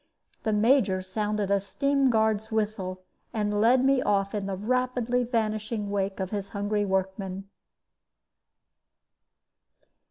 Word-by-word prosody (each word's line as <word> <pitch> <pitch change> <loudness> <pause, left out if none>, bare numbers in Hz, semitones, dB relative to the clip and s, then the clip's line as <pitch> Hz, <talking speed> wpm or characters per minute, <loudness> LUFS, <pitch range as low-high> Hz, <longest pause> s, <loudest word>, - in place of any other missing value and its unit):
The 220 - -1
Major 210 -3 +3
sounded 210 +1 -2
a 200 - +4
steam 275 +7 +1
guard's 220 -1 +1
whistle, 205 -4 -2 0.3
and 210 -1 0
led 250 +3 +4
me 270 -1 +4
off 200 -4 +1
in 205 -2 -2
the 195 -1 -3
rapidly 250 +2 0
vanishing 215 -3 -2
wake 195 -1 -1
of 190 -1 -3
his 200 -2 -3
hungry 205 0 -1
workmen. 190 0 -2
210 Hz, 120 wpm, -27 LUFS, 195-230 Hz, 0.3 s, a